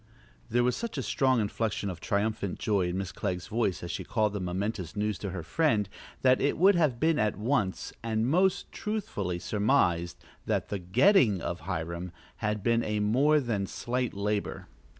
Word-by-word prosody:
There 120 +1 +2
was 125 0 +2
such 235 -8 -4
a 135 - -1
strong 130 +3 +2
inflection 105 -1 -1
of 90 -4 -5
triumphant 100 +1 -1
joy 100 -4 +1
in 90 +1 -2
Miss 95 -3 -3
Clegg's 90 +1 -3
voice 110 -5 -1
as 85 - -4
she - - -4
called 110 -3 0
the 105 - -2
momentous 95 0 -3
news 105 -1 -1
to 100 - -4
her 95 -2 -5
friend 110 - +1 0.4
that 130 -1 +5
it 145 - +1
would 195 +4 +6
have 155 -9 +2
been 160 +1 +2
at 105 -1 +1
once 110 -4 -1
and 110 -1 0
most 180 +6 +2
truthfully 145 - -3
surmised 90 -3 +1 0.3
that - - 0
the 100 - -2
getting 110 - +4
of 85 +1 -4
Hiram 85 0 -4 0.3
had 105 -2 -2
been 115 0 +2
a 105 0 -1
more 135 +9 +4
than 110 -7 -1
slight 125 +2 -2
labor. 105 +1 -2
105 Hz, 180 wpm, -29 LUFS, 95-125 Hz, 0.4 s, would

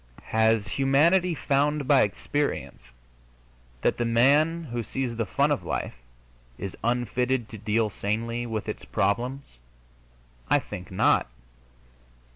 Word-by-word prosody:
Has 110 -1 +3
humanity 160 - +3
found 145 0 0
by 140 -1 +6
experience 105 - -2 0.9
that - - +2
the 120 - 0
man 145 +8 +3
who 120 -5 -4
sees 120 +2 -3
the 115 -2 -2
fun - - +1
of - - 0
life - - -3 0.6
is 95 - -6
unfitted 125 +1 0
to 110 - -9
deal 110 +1 0
sanely 115 +4 -2
with 110 -2 -4
its - - -5
problems? 125 +7 -1 1.1
I - - +5
think 90 - -7
not. 95 - +2
120 Hz, 120 wpm, -26 LUFS, 110-140 Hz, 1.1 s, by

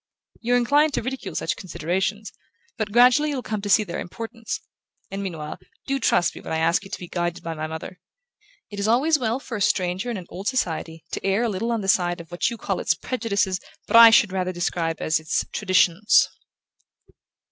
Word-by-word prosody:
You're 245 +1 +2
inclined 290 +5 +3
to - - -1
ridicule 260 +2 -5
such - - -1
considerations, 190 +4 -3 0.4
but 215 -3 -3
gradually 250 +6 +5
you'll 270 -4 -3
come 215 -2 -3
to 205 - -4
see 215 +2 +5
their 175 -4 -5
importance; 230 +4 -6 0.5
and 195 +1 -4
meanwhile, 160 -6 -5 0.3
do 275 0 -1
trust 175 -8 +2
me - - -10
when - - -8
I 160 - 0
ask 165 +4 +2
you 195 - -11
to - - -4
be 180 - -8
guided 175 0 -3
by 165 - -4
my 155 0 -4
mother. 160 +3 -7 0.7
It 205 - -6
is 200 - 0
always 290 +7 +3
well 235 0 -1
for 245 -4 -6
a - - -6
stranger 190 +1 0
in 235 - -3
an 185 - -8
old 195 +3 -7
society 165 -9 -2
to - - -4
err 195 +4 +1
a 235 - +1
little 215 +4 -2
on 230 -2 -1
the 195 - -5
side 175 -2 +2
of 170 0 -11
what 175 - 0
you 235 - -6
call - - -2
its - - +1
prejudices 200 -6 -1 0.3
but - - -1
I 230 0 +11
should 225 -3 +5
rather 185 -1 -1
describe 170 -2 -2
as 155 0 +1
its 155 0 -1
traditions." 185 0 +3
200 Hz, 210 wpm, -24 LUFS, 175-230 Hz, 0.7 s, I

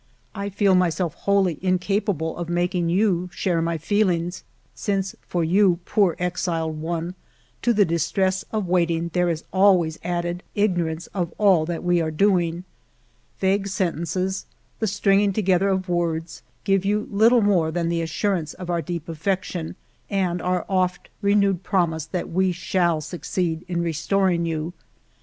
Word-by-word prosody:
I 200 -1 -4
feel 200 0 +2
myself 180 -2 +1
wholly 195 -5 +1
incapable 185 -2 0
of 170 -1 -5
making 175 0 0
you 180 -1 +1
share 175 -3 0
my 165 0 -1
feelings, 175 -1 0 0.3
since 195 -1 -2
for 175 -1 -2
you, 180 +2 +4
poor 195 -6 +2
exiled 165 -3 -2
one, 170 +2 -3 0.5
to 240 - +2
the 210 -3 +4
distress 185 +3 0
of 215 -3 -1
wait 175 -1 +2
ing 170 0 -1
there 180 -1 +2
is 165 -2 -2
always 185 -5 +4
added 175 0 -2
ignorance 175 -5 0
of 175 -4 -2
all 190 -7 +4
that 170 -1 -3
we 175 -1 +2
are 160 - -1
doing. 175 0 +1 0.8
Vague 195 +1 +1
sentences, 185 0 -2 0.3
the 220 - 0
stringing 200 0 +2
together 190 -1 +2
of 190 -1 0
words, 170 -2 -2 0.2
give 195 -1 +2
you 210 +2 0
little 225 +3 +5
more 180 -6 +3
than 170 +1 -1
the 170 0 0
assurance 165 0 -1
of 180 -1 -5
our 170 -1 0
deep 170 0 -5
affection 175 0 -3 0.3
and 180 -3 0
our 180 -1 -1
oft 185 -2 -1
re 200 0 +3
newed 195 -3 +2
promise 165 -6 0
that 180 0 -4
we 185 +2 +2
shall 175 -2 0
succeed 170 0 -3
in 170 -1 -1
restoring 170 +1 +1
you. 160 +1 -3
180 Hz, 155 wpm, -23 LUFS, 170-195 Hz, 0.8 s, little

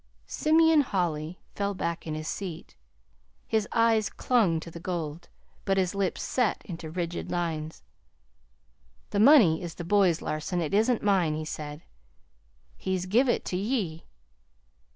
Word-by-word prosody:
Simeon 320 0 +4
Holly 175 - -2 0.2
fell 200 0 -2
back 170 -2 -3
in 155 - -3
his 155 0 -5
seat. 175 - -6 0.7
His 220 -2 0
eyes 225 -2 +3
clung 210 -10 +1
to 170 - -9
the 170 - -9
gold, 170 -2 -5 0.3
but 195 -1 +1
his 185 -1 +1
lips 200 -2 -1
set 245 -4 0
into 165 -3 -7
rigid 170 +1 -4
lines. 160 -3 -3 1.3
"That 200 - 0
money 215 - +6
is 170 -2 -6
the 175 - -6
boy's, 180 -2 +3
Larson. 155 +4 -2
It 160 -1 -2
isn't 225 +3 +2
mine," 185 -7 +2
he 155 0 -4
said. 150 0 -6 0.9
"He's 185 -1 -2
give 240 +8 +3
it - - 0
to 180 - -2
ye." 195 -6 -2
180 Hz, 145 wpm, -27 LUFS, 165-210 Hz, 1.3 s, money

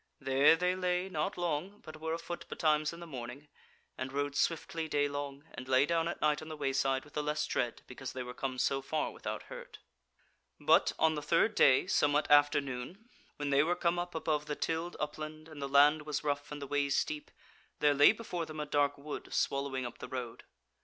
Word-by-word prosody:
There 135 +4 +5
they 180 +2 +1
lay 180 0 0
not 180 +2 -2
long, 175 +3 -2
but 155 0 -10
were 160 0 -1
afoot 170 +1 -7
betimes 155 -2 +1
in 170 - -10
the 170 - -8
morning, 135 0 -8 0.5
and 130 0 -3
rode 145 +1 -2
swiftly 165 +1 -1
daylong, 145 -1 -1
and 130 - -8
lay 130 +1 +4
down 165 +1 +1
at 170 - -4
night 150 0 +2
on 155 - -9
the 155 -1 -7
wayside 135 -1 0
with 145 - -18
the 150 - -1
less 150 +1 -1
dread 120 -1 -2
because 130 0 -7
they 130 - -4
were 125 0 -7
come 130 -1 -4
so 135 +2 +1
far 150 +3 -2
without - - -5
hurt. - - -10 0.8
But - - +4
on 160 0 +3
the 150 - -3
third 170 +8 +2
day, 135 -9 +5
somewhat 145 -4 +2
after 145 0 +6
noon, 140 - -7 0.3
when 145 -1 -3
they 140 0 +5
were 170 +4 +1
come 175 0 +1
up 175 0 -4
above 150 -2 -1
the 150 - -2
tilled 165 +3 -2
upland 155 +1 -5
and 155 -3 -10
the 140 - -3
land 145 +2 +6
was 150 -1 -3
rough 145 -1 -2
and 150 - -5
the 140 - -5
ways 140 0 +1
steep, 150 -1 -2 0.5
there 145 -1 +4
lay 145 +1 +7
before 180 -7 -5
them 155 0 -7
a 150 - -2
dark 145 -1 +1
wood 145 +1 -7
swallowing 140 -2 -1
up 120 - -7
the - - -7
road. 125 -3 -6
150 Hz, 210 wpm, -32 LUFS, 140-160 Hz, 0.8 s, lay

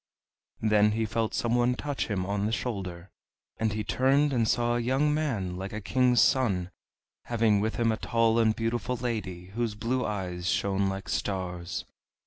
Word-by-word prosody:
Then 105 -1 +4
he 110 +1 0
felt 110 +1 -1
some 120 0 0
one 120 +1 +3
touch 145 +1 -3
him 95 -4 -1
on 100 +1 -1
the - - -1
shoulder; 95 -7 -4 0.5
and 110 -1 +1
he 105 0 -2
turned, 135 +6 +2
and 115 -3 +2
saw 120 +1 +2
a - - +1
young 135 +5 +2
man 115 -13 -1
like 95 +2 -5
a 110 - -3
king's 125 +3 +2
son, 95 -9 +1 0.5
having 115 -3 +2
with 110 +1 -1
him 115 -1 +2
a 110 - -1
tall 115 0 +2
and 110 -1 +3
beautiful 120 +2 -1
lady, 105 -7 -4
whose 115 -2 -1
blue 120 +4 -1
eyes 90 -4 -3
shone 100 +2 +1
like 95 0 -5
stars. 90 -1 -3
110 Hz, 175 wpm, -28 LUFS, 100-120 Hz, 0.5 s, Then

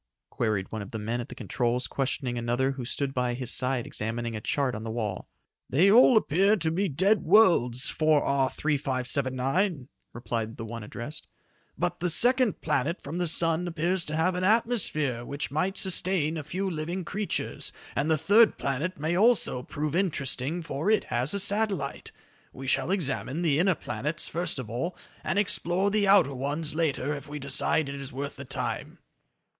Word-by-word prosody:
queried 105 -5 -1
one 110 - -4
of 100 - -8
the 110 - -4
men 115 +3 -3
at 120 - -9
the - - -9
controls 125 0 -1
questioning 135 -2 -2
another 120 +3 0
who 135 -2 -6
stood 135 +2 -2
by 125 -2 -1
his 125 -1 -2
side 130 -2 +1
examining 115 +1 -4
a 105 - -5
chart 135 +3 0
on 110 0 -5
the 115 - -5
wall. 110 -4 -4 0.4
"They 180 +9 +4
all 245 +1 +7
appear 195 +3 +3
to 160 -3 -1
be 190 +4 0
dead 190 +8 +2
worlds, 165 - +4
4R 140 -4 +2
3579," 135 +2 -1 0.2
replied 115 -2 -4
the 115 - -6
one 115 +1 -6
addressed, 120 +7 -8 0.5
"but - - -2
the 180 - 0
second 245 - +3
planet 155 +2 0
from 160 +5 -6
the 175 - 0
sun 165 +1 +1
appears 170 +2 -1
to 150 - -4
have 165 +4 +2
an 180 +1 -2
atmosphere 185 - +1
which 140 +2 -4
might 180 +7 -1
sustain 180 -4 +2
a 155 - -4
few 185 +7 -3
living 170 +1 -3
creatures, 205 +2 -3 0.2
and 140 +4 0
the 160 - +3
third 205 +9 +4
planet 140 +7 -2
may 160 +4 -1
also 210 - +3
prove 150 +3 -4
interesting 155 -3 -1
for 160 +4 -2
it 220 - +3
has 125 +9 0
a - - +2
satellite. 200 -7 +1 0.4
We 135 - -9
shall 135 - 0
examine 165 -3 -1
the 150 -3 +2
inner 185 0 +3
planets 145 +7 -3
first 170 -2 -2
of 130 -4 -5
all, 125 - -4 0.3
and 190 - -1
explore 190 -1 +1
the 205 -1 +2
outer 195 -8 +5
ones 145 +4 -2
later 150 -3 -1
if 145 0 -8
we 150 - -5
decide 140 +2 +1
it 140 - -5
is 135 - -7
worth 140 +2 -5
the 140 - -8
time." - - -3
150 Hz, 180 wpm, -27 LUFS, 130-180 Hz, 0.5 s, all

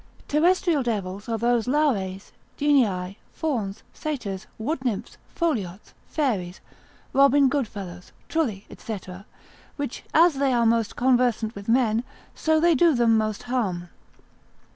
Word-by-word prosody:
Terrestrial 335 0 +2
devils 205 -4 -3
are 225 - 0
those 235 +1 +1
Lares, 215 -10 0 0.3
genii, 210 -10 +1
fauns, 225 -10 -3
satyrs, 235 -11 -4
wood 260 +5 -3
nymphs, 230 -6 -3 0.2
foliots, 215 - -2
fairies, 200 - -1 0.5
Robin 275 +1 +5
Goodfellows, 205 -10 -4 0.2
trulli, 235 -12 -1
&c., 220 -3 -5 0.8
which 285 -4 -5
as 325 -3 +4
they 275 -2 +2
are 235 -1 +3
most 230 -1 +1
conversant 245 -3 +2
with 200 0 -8
men, 230 -2 +3 0.3
so 315 0 +2
they 340 +1 +4
do 320 +1 +4
them 235 -2 +4
most 215 -1 -1
harm. 195 -9 -2
240 Hz, 120 wpm, -25 LUFS, 205-285 Hz, 0.8 s, Robin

